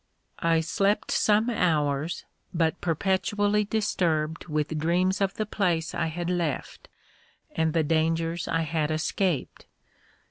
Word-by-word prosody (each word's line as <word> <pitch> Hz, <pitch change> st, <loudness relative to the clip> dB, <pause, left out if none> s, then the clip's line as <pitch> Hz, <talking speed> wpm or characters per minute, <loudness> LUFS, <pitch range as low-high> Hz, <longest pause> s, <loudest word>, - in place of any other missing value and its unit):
I 165 Hz, -1 st, +2 dB
slept 195 Hz, +5 st, 0 dB
some 215 Hz, +2 st, +3 dB
hours, 155 Hz, -6 st, 0 dB, 0.3 s
but 165 Hz, -1 st, +1 dB
perpetually 205 Hz, +4 st, +1 dB
disturbed 165 Hz, -8 st, 0 dB
with 155 Hz, 0 st, -1 dB
dreams 180 Hz, +5 st, +1 dB
of 195 Hz, 0 st, +1 dB
the 215 Hz, -, -1 dB
place 175 Hz, -6 st, 0 dB
I 165 Hz, -, 0 dB
had 170 Hz, +2 st, -4 dB
left, 175 Hz, -5 st, -2 dB, 0.6 s
and 160 Hz, -1 st, 0 dB
the 165 Hz, -2 st, +2 dB
dangers 165 Hz, +2 st, 0 dB
I 165 Hz, -, +1 dB
had 160 Hz, -1 st, -1 dB
escaped. 160 Hz, +1 st, -1 dB
165 Hz, 120 wpm, -27 LUFS, 160-190 Hz, 0.6 s, some